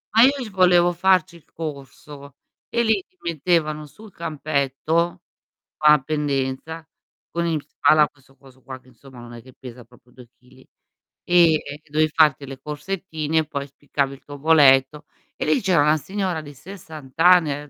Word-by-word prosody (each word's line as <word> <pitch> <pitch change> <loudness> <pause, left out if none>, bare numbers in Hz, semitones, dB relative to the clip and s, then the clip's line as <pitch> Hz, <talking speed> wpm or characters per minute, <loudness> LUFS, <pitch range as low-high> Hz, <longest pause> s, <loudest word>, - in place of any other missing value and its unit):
Ma 225 - +7
io 270 - +6
c 260 -6 -6
volevo 180 -2 +3
farci 185 0 +2
il 165 - -18
corso, 140 -2 -9 0.3
e 235 0 0
lì 215 -4 +1
ti 185 - -42
mettevano 155 -2 -1
sul 210 +7 -16
campetto, 155 +2 -2 0.6
va 150 0 +6
in 135 - -11
pendenza, 150 +2 -3 0.4
con 170 0 -2
in 160 -3 -1
spalla 150 +1 +3
questo 135 -1 -27
coso 130 -1 -20
qua 130 -1 -9
che 130 - -25
insomma 130 +1 -17
non 120 0 -11
è 115 - -11
che 130 +1 -16
pesa 125 -2 -11
proprio 125 +1 -24
2 125 -2 -16
chili, 130 +1 -22 0.6
e 175 -2 +4
e 145 -1 -5
dovevi 155 +1 +1
farti 150 -3 +3
le 135 -1 -10
corsettine, 160 0 -3
poi 140 -1 -5
spiccavi 140 0 -3
il 135 - -17
tuo 145 0 -10
voletto. 150 -1 +4 0.3
E - - -3
lì 155 - +2
c'era 185 -6 +2
una 150 +1 +3
signora 185 +1 -3
di 145 -1 -11
60 155 -4 -12
anni, 165 -5 +4
150 Hz, 170 wpm, -22 LUFS, 135-170 Hz, 0.6 s, Ma